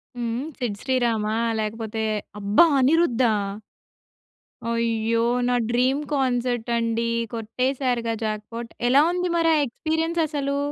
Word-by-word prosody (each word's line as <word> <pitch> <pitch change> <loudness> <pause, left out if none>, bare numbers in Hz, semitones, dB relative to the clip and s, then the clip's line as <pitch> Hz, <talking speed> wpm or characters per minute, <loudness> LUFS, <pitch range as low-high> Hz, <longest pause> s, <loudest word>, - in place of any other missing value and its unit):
హ్మ్. 240 +1 -2
'సిద్ 230 -6 -3
శ్రీరామా' 230 -4 0 0.2
లేకపోతే 220 +1 -3 0.4
అబ్బా! 205 +10 +5
'అనిరుద్దా?' 260 -4 +3 1.4
అయ్యో! 230 0 +1 0.2
నా 250 - +2
డ్రీమ్ 255 +3 +2
కాన్సర్ట్ 245 -3 0
అండి 230 0 0 0.3
కొట్టేసారుగా 245 +1 -1
జాక్‌పాట్ 220 +2 -4 0.2
ఎలా 270 +3 +6
ఉంది 360 0 -1
మరి 330 -1 +3
ఆ - - +3
ఎక్స్‌పీరియెన్స్ 320 +6 -2
అసలు? 280 -2 -2
240 Hz, 105 wpm, -24 LUFS, 225-270 Hz, 1.4 s, ఎలా